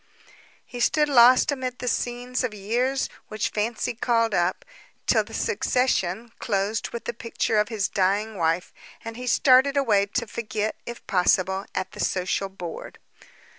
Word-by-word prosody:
He 245 - -8
stood 300 +5 +3
lost 255 0 +6
amid 255 -3 -3
the 250 - -6
scenes 245 +1 -2
of 230 -4 -2
years 245 +7 0 0.2
which 215 0 -2
fancy 220 +3 -1
called 230 -1 +1
up, 175 0 0 0.4
till - - +3
the - - -15
succession 235 -3 0
closed 205 +1 -1
with 235 - -7
the 235 - -3
picture 230 -1 -1
of 210 - +1
his 215 -3 -1
dying 205 +3 0
wife, 165 0 0 0.3
and 230 0 -6
he 250 +1 -7
started 265 +2 +4
away, 210 -7 +3
to 235 +4 -2
forget 215 -1 -3
it, - - -13
if 235 - -9
possible, 190 +1 +1
at 185 0 -2
the - - -12
social 185 +1 -1
board. 175 -3 -8
225 Hz, 160 wpm, -25 LUFS, 195-245 Hz, 0.4 s, lost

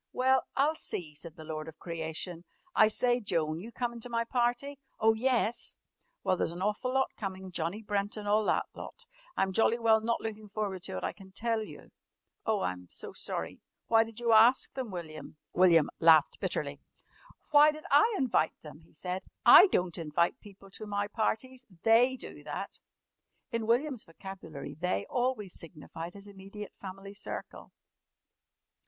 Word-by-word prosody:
"Well, 260 0 +3
I'll 290 +3 +3
see," 175 - -6
said 160 +2 -10
the 160 - -10
lord 155 0 -5
of 160 0 -10
creation. 165 +1 -5 0.3
"I 220 - +6
say, 245 +3 +1
Joan, 160 -7 -1
you 220 +6 -8
comin' 235 -1 -3
to 245 - -8
my 230 -1 0
party?" 245 +3 -1 0.2
"Oh, 220 +1 +5
yes!" 240 0 0 0.5
"Well, - - +2
there's 175 - -1
an 175 +2 -5
awful 210 +5 0
lot 265 0 +2
comin'. 190 -2 -5
Johnny 175 +5 -3
Brent 205 0 -1
an' 210 - -6
all 210 +1 +3
that - - +2
lot. 480 - -9 0.3
I'm 190 0 +1
jolly 225 +3 +3
well 225 -2 +4
not 230 +1 0
lookin' 215 -1 -6
forward 200 -3 -3
to - - -5
it, - - -5
I - - -1
can 190 -1 -15
tell 225 +1 0
you." 215 - -10 0.6
"Oh, 215 -3 +2
I'm 90 0 -3
so - - -9
sorry! - - -3 0.3
Why 225 -1 +6
did 225 0 -10
you 235 -1 +2
ask 230 +4 +6
them, 260 -4 -4
William?" 155 -5 -8 0.2
William 170 -4 +5
laughed 160 -2 +6
bitterly. 145 -6 -3 0.7
"Why 300 +1 +8
did 305 0 -10
I 430 +12 +6
invite 245 -11 +1
them?" 150 -1 -10
he 165 - -23
said. 180 +4 -4 0.2
"I - - +11
don't 180 - 0
invite 165 +2 0
people 195 -1 -15
to 215 +2 -8
my 205 0 -1
parties. 250 +4 -2 0.2
They 240 +3 +5
do - - -10
that." - - -6 0.7
In 230 -2 -2
William's 250 +1 +1
vocabulary 165 -5 -9
"they" 155 - -1
always 245 -6 -1
signified 165 +1 -7
his 200 0 -11
immediate 200 +1 -9
family 195 +1 -8
circle. 205 - -8
205 Hz, 170 wpm, -31 LUFS, 170-235 Hz, 0.7 s, I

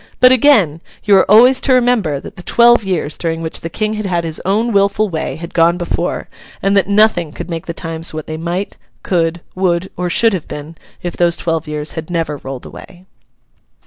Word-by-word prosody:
But 255 0 +7
again, 220 - +4 0.2
you 205 -2 +4
are 190 - +2
always 250 +5 +6
to 265 - +2
remember 240 - +2
that - - -11
the - - -9
twelve 235 +5 +4
years 175 -6 -2
during 165 -1 -2
which 160 - -3
the 165 - -5
King 215 +5 -2
had 215 -2 -3
had 175 -2 -1
his 160 -1 -4
own 215 +5 0
wilful 200 +1 +2
way, 160 -2 -3
had 170 +1 -9
gone 170 +1 +3
before; 175 0 -3 0.3
and 195 +1 +1
that 195 -2 +3
nothing 200 -6 +3
could 175 +3 -8
make 165 -1 -5
the 170 - -3
times 165 0 -4
what 155 -1 -6
they 155 - -5
might, 175 +5 -4 0.3
could, 170 -2 0
would, 185 -1 -1
or 180 0 -2
should 225 +5 +3
have 180 -5 -4
been, 150 +3 -8 0.3
if 175 -1 -4
those 170 -1 +1
twelve 165 -1 -2
years 150 0 -4
had 160 0 -6
never 165 -4 -2
rolled 135 -2 -8
away. 185 -1 -12
175 Hz, 210 wpm, -16 LUFS, 165-205 Hz, 0.3 s, But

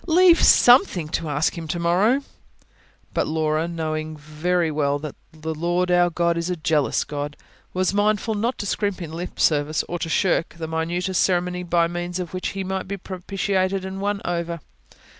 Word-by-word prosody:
"Leave 345 +1 +6
something 245 - +5
to 160 0 -3
ask 145 +2 0
Him 165 -2 -6
to 175 - -2
morrow." 195 +11 +2 0.9
But - - 0
Laura, 155 0 0
knowing 155 -2 -3
very 160 +3 -1
well 145 -1 +1
that 150 -1 -6 0.2
the 160 0 -5
Lord 175 +3 0
our 175 0 +4
God 170 0 0
is 170 +2 -3
a 180 - 0
jealous 155 -3 +1
God, 145 0 -5 0.3
was 185 +1 0
mindful 210 +2 +1
not 230 +4 -1
to - - -4
scrimp 200 0 -1
in 165 -3 -7
lip 175 +2 -6
service, 150 0 +2
or 175 - -4
to 165 - -3
shirk 165 +1 +1
the 160 -1 -4
minutest 175 +3 -1
ceremony 180 -1 +1
by 170 -1 +2
means 175 +1 -4
of 180 -2 -5
which 185 - -2
He 195 - -1
might 190 0 -3
be 200 +1 -4
propitiated 190 0 -2
and 190 +1 -5
won 200 0 -1
over. 170 -1 -2
175 Hz, 180 wpm, -23 LUFS, 160-190 Hz, 0.9 s, Leave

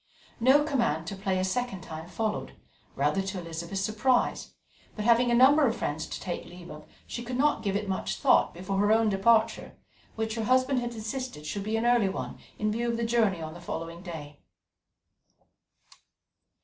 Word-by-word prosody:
No 265 +5 +5
command 235 - 0
to 195 - -5
play 190 -1 -1
a 185 - 0
second 195 0 -2
time 160 -2 -8
followed, 215 +2 -3 0.4
rather 150 +8 +1
to 190 0 -4
Elizabeth's 170 +3 -5
surprise, 230 +5 0 0.4
but 210 - -4
having 240 +1 +4
a 240 - +3
number 275 +4 +6
of 225 - 0
friends 155 -4 -3
to - - -6
take 180 -2 -4
leave 175 -1 -11
of, 150 0 -11 0.2
she 240 - -5
could 245 +1 -4
not 290 -3 +2
give 200 -3 -1
it 205 0 -1
much 190 -1 -2
thought - - +3
before 190 +3 -3
her 205 +1 +3
own 225 0 +4
departure, 220 +3 +2 0.4
which 220 0 -2
her 225 -1 -2
husband 255 +2 +3
had 240 -1 -4
insisted 225 - -5
should 200 +7 -3
be 215 +2 -1
an 225 - -1
early 240 -5 +4
one, 190 - -5 0.2
in 215 0 0
view 235 +2 -1
of 230 - -1
the 235 - -1
journey 220 -7 +1
on 155 0 -6
the 175 - -11
following 165 0 -6
day. 150 -5 -8
210 Hz, 190 wpm, -28 LUFS, 180-235 Hz, 0.4 s, number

